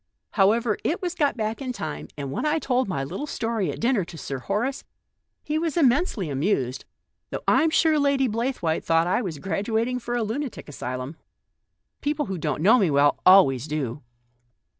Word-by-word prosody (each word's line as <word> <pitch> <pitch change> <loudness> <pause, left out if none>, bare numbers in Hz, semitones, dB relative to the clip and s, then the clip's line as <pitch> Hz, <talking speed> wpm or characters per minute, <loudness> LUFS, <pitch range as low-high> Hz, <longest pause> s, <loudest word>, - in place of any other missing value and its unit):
However, 215 +2 +2
it 335 - 0
was 355 -2 -3
got 290 -7 0
back 220 +3 -2
in 255 -2 -3
time, 155 -9 -5
and 140 -2 -4
when - - -3
I 305 +1 +2
told 255 -4 0
my 140 -8 -2
little 185 - -5
story 225 - -2
at - - -8
dinner 235 -4 +2
to 165 - -11
Sir 135 -3 -5
Horace, 215 - -2 0.6
he 305 +1 -1
was 330 0 -2
immensely 265 - +2
amused, 135 - -1 0.4
though - - -5
I'm 320 - +4
sure 315 -1 +3
Lady 280 -2 +2
Blaythewaite 230 -8 -1
thought 165 0 +3
I 180 +7 +1
was 180 -9 -4
graduating 220 - -1
for 240 0 -4
a 240 - 0
lunatic 245 +4 -4
asylum. 130 +1 -5 0.8
People 295 0 -1
who 190 -5 -4
don't 150 0 -2
know 225 +6 +6
me 190 -6 +3
well 145 0 +3
always 150 -9 +6
do." 145 -3 -3
215 Hz, 180 wpm, -25 LUFS, -, 0.8 s, know